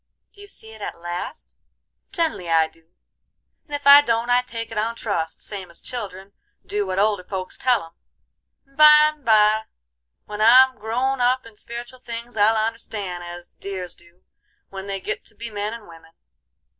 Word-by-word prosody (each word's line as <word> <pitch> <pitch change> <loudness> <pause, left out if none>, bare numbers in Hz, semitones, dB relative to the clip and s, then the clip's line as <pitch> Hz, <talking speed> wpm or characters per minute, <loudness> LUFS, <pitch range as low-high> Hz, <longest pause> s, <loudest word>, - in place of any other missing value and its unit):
"Do 405 - -15
you 410 - -11
see 220 - -7
it 220 -1 -13
at - - -5
last?" 175 +1 -6 0.5
"Gen'lly 325 - -1
I 160 -1 +4
do; 165 0 -25 0.7
and 295 - -4
if 285 - -6
I 280 +1 +10
don't 235 -2 0
I 245 0 +5
take 230 -2 -7
it 225 - -6
on 230 +2 -1
trust, 170 -8 -3
same 195 -4 -7
as 170 - -12
children 200 -5 -7 0.3
do 205 -1 -2
what 185 0 -3
older 205 -2 +2
folks 185 -1 -5
tell 245 -6 +1
'em; 165 - -13 0.7
and 275 0 -29
byme 300 0 +7
by 215 -1 +4 0.6
when 210 0 -6
I'm 255 +2 +7
grown 250 +5 -1
up 250 +1 +2
in 225 -2 -14
spiritual 240 +3 -8
things 235 -1 -7
I'll 220 +1 +4
understan' 215 -5 -3
as 175 0 -9
the - - -45
dears 185 -3 -5
do, 170 +1 -16 0.5
when 195 0 -8
they 195 -1 -3
git - - -4
to - - -13
be 230 -1 -7
men 205 0 -3
and 230 -2 -9
women." 165 -1 -16
220 Hz, 180 wpm, -22 LUFS, 190-245 Hz, 0.7 s, I